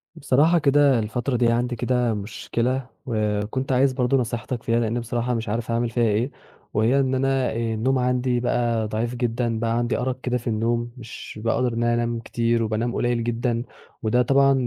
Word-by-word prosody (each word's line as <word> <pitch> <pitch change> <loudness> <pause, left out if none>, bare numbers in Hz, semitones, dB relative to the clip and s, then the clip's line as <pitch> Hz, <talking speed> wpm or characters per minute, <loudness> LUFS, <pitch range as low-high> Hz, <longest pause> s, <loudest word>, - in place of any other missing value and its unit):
بصراحة 150 +6 +3
كده 140 -3 +4
الفترة 120 +4 -2
دي 120 0 +3
عندي 120 +1 0
كده 120 -1 +1
مشكلة، 120 +5 -2 0.2
وكنت 110 +3 -1
عايز 130 +1 +3
برضه 125 +1 +2
نصيحتك 120 0 -3
فيها، 115 0 +1
لإني 115 +1 0
بصراحة 120 +1 -2
مش 115 -2 -3
عارف 115 +2 -2
أعمل 115 0 0
فيها 120 +1 0
ايه، 115 +4 +1 0.4
وهي 115 +6 +3
إن 130 -1 +1
أنا 135 -1 +1
آآ - - -5 0.2
النوم 130 +4 +1
عندي 125 0 +1
بقى 120 -2 0
ضعيف 115 +3 -2
جدًا 120 -1 -1
بقى 115 0 0
عندي 120 0 0
أرق 130 0 -2
كده 125 -1 0
في 120 - -9
النوم 115 +1 0
مش 115 -2 -9
باقدر 120 +1 +1
أنام 120 0 0
كتير 115 0 0
وبانام 110 +2 -1
قليّل 120 -1 0
جدًا، 120 0 -1 0.4
وده 115 +3 +3
طبعًا 135 +2 +4
120 Hz, 175 wpm, -23 LUFS, 115-125 Hz, 0.4 s, كده